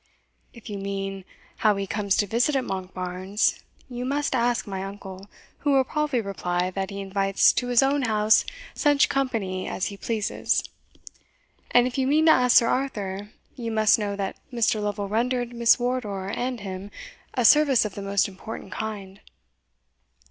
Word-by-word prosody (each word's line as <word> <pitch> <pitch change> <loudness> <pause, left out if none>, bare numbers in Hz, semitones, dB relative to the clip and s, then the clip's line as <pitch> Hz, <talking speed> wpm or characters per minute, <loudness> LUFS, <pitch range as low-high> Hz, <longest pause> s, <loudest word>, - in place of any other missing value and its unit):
"If 235 -1 -14
you 205 -2 -5
mean, 195 -1 -4 0.3
how 215 -2 +3
he 195 0 -2
comes 200 0 0
to 205 - +2
visit 240 +8 +1
at 265 - +1
Monkbarns, 185 +1 -2 0.3
you 245 -1 -5
must 285 +3 -1
ask 240 -4 +1
my 190 -2 -4
uncle, 195 0 -9 0.3
who 290 -1 +1
will 270 -1 +5
probably 290 -2 -1
reply, 180 -3 -2
that 190 0 -3
he 200 -1 -6
invites 195 0 +2
to 245 - -1
his 245 +1 +4
own 275 +1 +2
house 215 -2 +3 0.3
such 290 -2 +3
company 225 -9 -1
as 185 - -2
he 200 - -9
pleases; 220 0 -1 1.1
and 245 0 +5
if 255 +1 -2
you 260 - +1
mean 305 +3 +3
to 320 - +8
ask 250 -4 +5
Sir 230 - +5
Arthur, 205 -7 -2 0.3
you 235 -2 -4
must 220 +1 +4
know 205 -1 -2
that 195 -1 -4
Mr. 230 -3 +1
Lovel 205 -1 -2
rendered 245 +3 -1
Miss 235 0 +4
Wardour 220 -6 -2
and 245 -1 -3
him 190 0 -6 0.5
a 245 - +1
service 280 -2 +6
of 210 - -4
the 200 - -7
most 200 0 +1
important 195 0 -9
kind." 200 -2 -6
215 Hz, 170 wpm, -25 LUFS, 195-245 Hz, 1.1 s, to